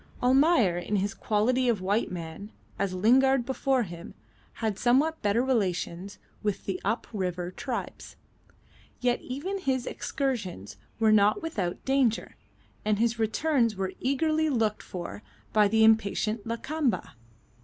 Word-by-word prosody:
Almayer 255 - +4
in 190 +4 -2
his 200 0 0
quality 240 +6 +1
of 225 -4 +1
white 200 +4 0
man 175 +4 -7 0.3
as 195 -2 -1
Lingard 255 +6 +4
before 265 0 +1
him 170 -4 -9 0.4
had 220 -4 -3
somewhat 280 +7 +2
better 210 +4 +2
relations 195 -5 -1 0.2
with 210 -2 -2
the 190 -2 -3
up 225 +4 -1
river 180 -3 -2
tribes. 245 +5 -6 0.8
Yet 245 -1 +1
even 340 +10 -4
his 260 -7 -1
excursions 220 - -3 0.2
were 220 -1 +4
not 210 +3 +4
without 195 - -3
danger, 265 -4 +1 0.5
and 210 -1 +1
his 230 +1 +1
returns 230 +1 +1
were 190 -1 -3
eagerly 310 +4 +1
looked 225 -6 0
for 180 +2 -7 0.3
by 210 -1 +5
the 220 +2 +3
impatient 220 0 +2
Lakamba. 240 - -1
220 Hz, 135 wpm, -28 LUFS, 200-260 Hz, 0.8 s, by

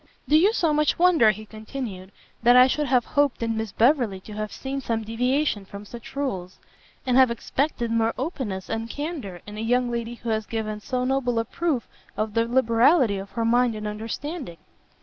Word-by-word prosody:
"Do 295 - +4
you 365 +7 +6
so 335 -9 +1
much 300 0 +2
wonder," 335 -10 +5
he 215 +1 -2
continued, 215 -3 -7 0.3
"that 240 +1 +6
I 250 0 +9
should 295 +3 0
have 250 -2 +3
hoped 285 -4 +1
in 225 -1 -1
Miss 220 -2 -3
Beverley 235 -4 +2
to 210 - -10
have 215 0 -4
seen 275 +1 -4
some 225 -3 -2
deviation 250 +1 0
from 200 +1 -10
such 235 +4 -11
rules? 190 -11 -3 0.5
and 255 -1 +2
have 260 -2 +7
expected 240 0 -2
more 230 0 +1
openness 250 - -4
and 225 0 -3
candour 280 - -5
in 210 0 -8
a - - -3
young 245 +2 +1
lady 235 0 -3
who 235 0 -6
has 220 -1 -1
given 215 -2 -3
so 250 +4 -2
noble 255 -2 0
a 230 - +1
proof 290 -1 -2 0.3
of 215 0 -1
the 230 +1 +1
liberality 235 - +3
of 195 +1 -8
her 230 +2 -1
mind 240 0 +3
and 215 0 -6
understanding?" 225 - -5
235 Hz, 195 wpm, -25 LUFS, 215-265 Hz, 0.5 s, I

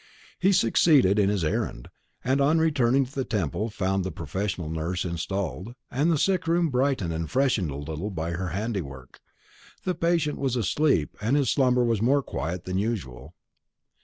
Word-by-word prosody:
He 190 +2 +4
succeeded 130 - +4
in 100 -1 +3
his 100 -4 0
errand; 75 -5 -2 0.4
and 135 +2 +1
on 150 +4 +4
returning 135 -5 +3
to 125 - -14
the 135 - -1
Temple 105 - -2
found 95 -3 -1
the 95 - -3
professional 90 +2 -3
nurse 80 +4 -2
installed, 95 +5 -4 0.2
and 145 +7 +1
the 160 - +2
sick 185 +2 +1
room 170 0 +2
brightened 125 - 0
and 80 0 -3
freshened 125 - +1
a 70 - -5
little 80 +7 -5
by 85 -3 -3
her 90 +2 -3
handiwork. 90 - -5 0.6
The 185 - 0
patient 170 -3 0
was 135 -3 0
asleep, 120 - +1
and 115 +7 +2
his 135 -7 +2
slumber 125 -2 +3
was 115 -3 +1
more 135 +4 +3
quiet 85 -3 -4
than 95 +1 -1
usual. 95 - -4
105 Hz, 170 wpm, -26 LUFS, 90-135 Hz, 0.6 s, He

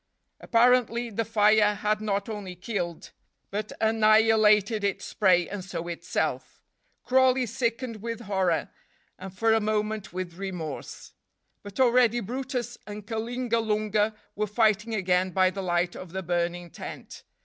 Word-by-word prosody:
Apparently 240 0 +2
the 230 +2 -1
fire 210 -1 +4
had 210 +1 -1
not 200 -2 -1
only 205 -5 -6
killed, 180 -3 -4 0.4
but 210 +2 -3
annihilated 220 -1 +4
its 200 -1 -2
prey 180 -4 +3
and 200 -2 -6
so 170 -2 -5
itself. 170 -1 -3 0.4
Crawley 260 0 +3
sickened 235 -1 -3
with 230 +1 -5
horror, 190 -6 0 0.5
and 190 0 -7
for 225 +4 +2
a 225 - +4
moment 215 -1 -2
with 180 -1 -6
remorse. 180 -7 -6 0.5
But 205 +2 -10
already 240 -2 +4
brutus 245 +2 -4
and 210 0 -8
Kalingalunga 220 -2 -1 0.2
were 210 +1 -1
fighting 215 +1 +1
again 185 -2 +1
by 185 0 +3
the 195 - -5
light 175 -1 0
of 180 -2 -9
the 190 0 -3
burning 175 0 -2
tent. - - -9
210 Hz, 135 wpm, -27 LUFS, 190-230 Hz, 0.5 s, fire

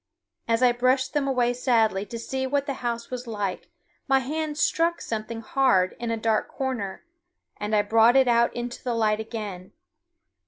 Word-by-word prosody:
As 230 +2 +2
I 250 - +6
brushed 255 +2 +1
them 285 -2 0
away 245 -2 +2
sadly 225 -5 +1
to 230 - -6
see 265 +3 -3
what 280 +1 0
the 280 - -2
house 235 -1 -3
was 250 -1 -5
like, 205 -4 -4 0.4
my 270 -1 +4
hand 300 +3 -3
struck 335 +2 +1
something 225 +1 -5
hard 220 -7 +2
in 235 -1 -3
a 230 - -1
dark 220 -1 0
corner, 250 - -4 0.5
and 210 +1 -1
I 205 - +3
brought 225 +3 +4
it 265 -1 +5
out 235 0 +3
into 240 0 -5
the 245 -2 -1
light 215 -1 +1
again. 210 -5 -6
235 Hz, 180 wpm, -25 LUFS, 220-260 Hz, 0.5 s, I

